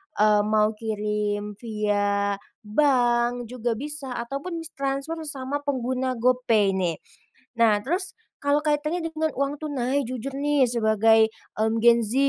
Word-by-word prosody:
eee, 210 Hz, 0 st, +4 dB
mau 215 Hz, 0 st, +3 dB
kirim 210 Hz, -1 st, -2 dB
via 205 Hz, -2 st, 0 dB, 0.2 s
bank 240 Hz, -1 st, +2 dB
juga 240 Hz, -1 st, -1 dB
bisa 285 Hz, +1 st, -5 dB
ataupun 280 Hz, +8 st, -5 dB
s 325 Hz, -, -9 dB
transfer 275 Hz, +4 st, -2 dB
sama 280 Hz, 0 st, -3 dB
pengguna 260 Hz, -1 st, -1 dB
GoPay 235 Hz, -4 st, +2 dB
nih. 175 Hz, -3 st, 0 dB, 0.6 s
Nah, 220 Hz, -3 st, +5 dB
terus 370 Hz, +2 st, -1 dB, 0.3 s
kalau 285 Hz, +1 st, +3 dB
kaitannya 305 Hz, +3 st, 0 dB
dengan 315 Hz, 0 st, 0 dB
uang 280 Hz, +1 st, 0 dB
tunai, 280 Hz, -2 st, -1 dB
jujur 255 Hz, +2 st, -5 dB
nih 285 Hz, -1 st, +2 dB
sebagai, 220 Hz, -1 st, +4 dB, 0.3 s
mmm, 220 Hz, +1 st, +1 dB
gen 235 Hz, +1 st, +6 dB
Z, 215 Hz, +1 st, -3 dB
245 Hz, 130 wpm, -25 LUFS, 215-280 Hz, 0.6 s, gen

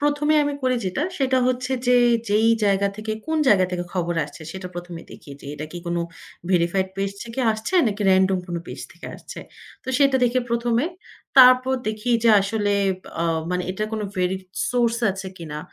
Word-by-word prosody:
১ম 290 Hz, 0 st, 0 dB
এ -, -, +4 dB
আমি 290 Hz, -, -1 dB
করি 255 Hz, -1 st, +2 dB
যেটা 185 Hz, +11 st, -2 dB, 0.2 s
সেটা 260 Hz, -2 st, +2 dB
হচ্ছে 255 Hz, +1 st, -1 dB
যে 250 Hz, 0 st, +5 dB, 0.3 s
যেই 215 Hz, +2 st, +3 dB, 0.2 s
জায়গা 200 Hz, 0 st, +2 dB
থেকে 215 Hz, 0 st, -4 dB
কোন 320 Hz, -, -1 dB
জায়গা 190 Hz, -3 st, +5 dB
থেকে 175 Hz, -1 st, -3 dB
খবর 175 Hz, -1 st, -1 dB
আসছে, 160 Hz, -, -12 dB
সেটা 190 Hz, -1 st, -7 dB
১ম 175 Hz, 0 st, -7 dB
এ -, -, -13 dB
দেখি, 150 Hz, -, -13 dB
যে -, -, -12 dB
এটা 150 Hz, +1 st, -6 dB
কি 175 Hz, -, -6 dB
কোনো 170 Hz, 0 st, -1 dB, 0.5 s
ভেরিফাইড 185 Hz, +1 st, +1 dB
পেজ 195 Hz, 0 st, -1 dB
থেকে 235 Hz, +3 st, -5 dB
আসছে 220 Hz, +12 st, -5 dB
নাকি 210 Hz, -1 st, -2 dB
random 190 Hz, 0 st, +3 dB
কোনো 170 Hz, -1 st, -3 dB
পেজ -, -, -8 dB
থেকে -, -, -11 dB
আসছে। -, -, -10 dB, 0.5 s
তো -, -, -10 dB
সেটা 275 Hz, -2 st, +4 dB
দেখে 245 Hz, +1 st, +2 dB
১ম 235 Hz, 0 st, 0 dB
এ, -, -, -1 dB, 0.5 s
তারপর 255 Hz, +1 st, +7 dB
দেখি 215 Hz, +3 st, -3 dB
যে -, -, +6 dB
আসলে 205 Hz, 0 st, 0 dB, 0.5 s
অ -, -, 0 dB, 0.3 s
মানে 180 Hz, 0 st, -1 dB
এটার 215 Hz, +3 st, -3 dB
কোনো 215 Hz, -1 st, -2 dB
ভেরি 180 Hz, +1 st, 0 dB, 0.3 s
সোর্স 235 Hz, -2 st, +1 dB
আছে 190 Hz, 0 st, -6 dB
কিনা। 155 Hz, -4 st, -7 dB
210 Hz, 195 wpm, -23 LUFS, 185-250 Hz, 0.5 s, তারপর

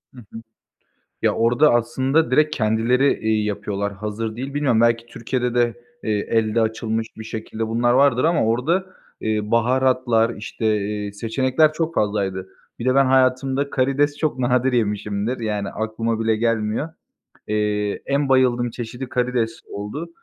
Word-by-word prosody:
Hı -, -, -11 dB
hı. 115 Hz, -, -8 dB, 0.8 s
Ya, -, -, +2 dB
orda 120 Hz, +6 st, +4 dB
aslında 130 Hz, +5 st, +1 dB
direkt 155 Hz, +3 st, +2 dB
kendileri, 115 Hz, +5 st, +2 dB
iii, 110 Hz, -1 st, +1 dB
yapıyorlar, 100 Hz, 0 st, -3 dB
hazır 105 Hz, +2 st, -5 dB
değil. 135 Hz, +3 st, -5 dB
Bilmiyorum 135 Hz, -6 st, +2 dB
belki 115 Hz, 0 st, +2 dB
Türkiye'de 120 Hz, +1 st, -3 dB
de, 120 Hz, -1 st, +2 dB, 0.3 s
eee, 110 Hz, -, -1 dB, 0.2 s
elde 115 Hz, 0 st, +2 dB
açılmış 110 Hz, 0 st, -1 dB
bir 110 Hz, -, -8 dB
şekilde 110 Hz, 0 st, -5 dB
bunlar 120 Hz, +2 st, +2 dB
vardır 130 Hz, 0 st, +4 dB
ama 165 Hz, -7 st, +3 dB
orda, 125 Hz, +9 st, +1 dB, 0.5 s
ııı, 105 Hz, -1 st, -1 dB
baharatlar, 120 Hz, -1 st, +2 dB
işte, 110 Hz, +1 st, -5 dB
eee, 105 Hz, 0 st, -3 dB
seçenekler 130 Hz, +8 st, +1 dB
çok 165 Hz, +1 st, -2 dB
fazlaydı. 95 Hz, -3 st, -1 dB, 0.3 s
Bir 115 Hz, -, -5 dB
de 130 Hz, +1 st, +2 dB
ben 135 Hz, -, +5 dB
hayatımda 130 Hz, +1 st, +2 dB
karides 140 Hz, +3 st, +1 dB
çok 155 Hz, -4 st, -1 dB
nadir 125 Hz, +1 st, +2 dB
yemişimdir, 105 Hz, +1 st, -1 dB
yani 105 Hz, -3 st, -2 dB
aklıma 110 Hz, +1 st, -2 dB
bile 110 Hz, -1 st, +1 dB
gelmiyor. 115 Hz, +5 st, 0 dB, 0.6 s
Eee, 105 Hz, -1 st, 0 dB
en 140 Hz, 0 st, 0 dB
bayıldığım 125 Hz, -2 st, +3 dB
çeşidi 120 Hz, +2 st, -7 dB
karides 125 Hz, -2 st, -1 dB
oldu. 105 Hz, +12 st, -5 dB
115 Hz, 145 wpm, -22 LUFS, 110-130 Hz, 0.8 s, ben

